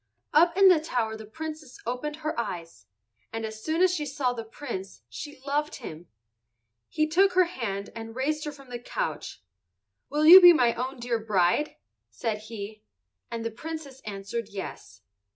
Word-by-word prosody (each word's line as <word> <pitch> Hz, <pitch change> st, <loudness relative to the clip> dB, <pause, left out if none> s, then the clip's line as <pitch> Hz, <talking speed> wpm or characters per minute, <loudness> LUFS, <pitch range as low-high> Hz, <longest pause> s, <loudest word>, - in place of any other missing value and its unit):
Up 340 Hz, +3 st, +5 dB
in 390 Hz, -1 st, +8 dB
the 360 Hz, -4 st, +7 dB
tower 240 Hz, -8 st, -1 dB
the 220 Hz, -1 st, -10 dB
Princess 310 Hz, +2 st, -7 dB
opened 250 Hz, +5 st, -3 dB
her 310 Hz, -, 0 dB
eyes, 165 Hz, -, -5 dB, 0.4 s
and 225 Hz, 0 st, -3 dB
as 220 Hz, 0 st, -7 dB
soon 320 Hz, +3 st, +1 dB
as 370 Hz, -1 st, +4 dB
she 315 Hz, -4 st, -1 dB
saw 275 Hz, -3 st, 0 dB
the 230 Hz, -2 st, -5 dB
Prince 195 Hz, -, -7 dB
she 290 Hz, -, -8 dB
loved 295 Hz, +2 st, -1 dB
him. 170 Hz, -, -9 dB, 0.8 s
He 310 Hz, -, +1 dB
took 365 Hz, +5 st, +3 dB
her 370 Hz, 0 st, +6 dB
hand 220 Hz, -, -4 dB
and 225 Hz, 0 st, -7 dB
raised 300 Hz, +4 st, -1 dB
her 300 Hz, -, -3 dB
from 275 Hz, -3 st, -15 dB
the 240 Hz, -, -4 dB
couch. 155 Hz, -, -4 dB, 0.7 s
"Will 300 Hz, +1 st, +1 dB
you 365 Hz, +4 st, +12 dB
be 350 Hz, -1 st, +10 dB
my 245 Hz, -7 st, +3 dB
own 255 Hz, +2 st, -4 dB
dear 235 Hz, -1 st, -1 dB
bride?" 210 Hz, -, +1 dB, 0.3 s
said 220 Hz, -3 st, -3 dB
he. 215 Hz, -1 st, -7 dB, 0.5 s
And 230 Hz, -1 st, -4 dB
the 230 Hz, -, -1 dB
Princess 280 Hz, +1 st, -7 dB
answered 205 Hz, +2 st, -5 dB
yes. 100 Hz, -, -8 dB
245 Hz, 170 wpm, -27 LUFS, 220-305 Hz, 0.8 s, you